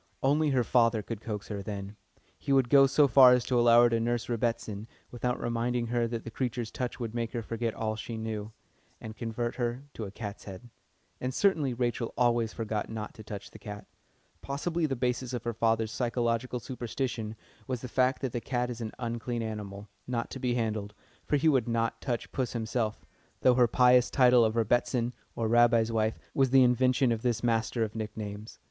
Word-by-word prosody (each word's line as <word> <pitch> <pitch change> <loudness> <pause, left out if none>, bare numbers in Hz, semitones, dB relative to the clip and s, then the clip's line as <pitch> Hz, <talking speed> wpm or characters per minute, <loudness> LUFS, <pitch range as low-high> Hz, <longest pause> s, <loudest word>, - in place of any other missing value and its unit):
Only 150 +3 +3
her 130 -3 +2
father 115 -2 +2
could 115 -1 -6
coax 105 -2 -5
her 100 -2 -4
then. 100 0 -6 0.4
He 140 - -3
would 135 -3 +4
go 135 -1 +7
so 140 +2 +4
far 130 0 +8
as 125 -1 +2
to 125 -2 +2
allow 120 0 +7
her 120 - +5
to 115 - +2
nurse 120 0 -1
"Rebbitzin," 115 -2 -2 0.2
without 125 0 -2
reminding 120 +1 -1
her 120 0 0
that 115 -1 -4
the 115 - -7
creature's 120 -2 -3
touch 125 0 -4
would 115 -2 -4
make 115 0 -3
her 120 -2 -3
forget 115 0 -3
all 110 -1 -2
she 110 +1 -6
knew, 110 -1 -4 0.5
and 110 0 -8
convert 115 +1 -3
her 120 +1 -2
into 110 - -5
a - - -6
"cat's 105 -1 -7
head." 100 +5 -10 0.5
And 130 - -2
certainly 150 -5 +1
Rachel 120 -1 -2
always 120 -2 +2
forgot 110 -2 -3
not 110 -2 -5
to 110 - -11
touch 105 -1 -8
the - - -12
cat. 105 -2 -8 0.6
Possibly 160 +4 -1
the 135 - -2
basis 125 0 -2
of 120 - -3
her 120 -1 -2
father's 115 -1 +1
psychological 120 0 -1
superstition 120 -2 -4 0.3
was 125 -3 -3
the 125 - -5
fact 130 +2 +1
that 130 - -1
the 120 - -3
cat 125 -1 -1
is 120 0 -7
an 110 -1 -5
unclean 120 0 -3
animal, 105 -2 -6 0.2
not 120 -2 -2
to 135 - -6
be 125 -1 0
handled, 110 -3 -2 0.3
for 145 - +2
he 145 - +1
would 130 -7 +3
not 115 -1 -1
touch 120 -4 -3
puss 130 -2 -2
himself, 110 -1 -2 0.4
though 130 - +5
her 125 -1 +4
pious 125 +1 +5
title 125 -3 +5
of 110 0 +1
"Rebbitzin," 120 +2 +1 0.2
or 115 - -1
Rabbi's 115 0 +4
wife, 110 -1 0 0.2
was 135 -1 +3
the 130 0 +6
invention 125 +1 +3
of 115 -1 -1
this 120 -2 -1
master 115 0 +1
of 110 -1 -3
nicknames. 105 -1 -6
120 Hz, 200 wpm, -29 LUFS, 110-125 Hz, 0.6 s, far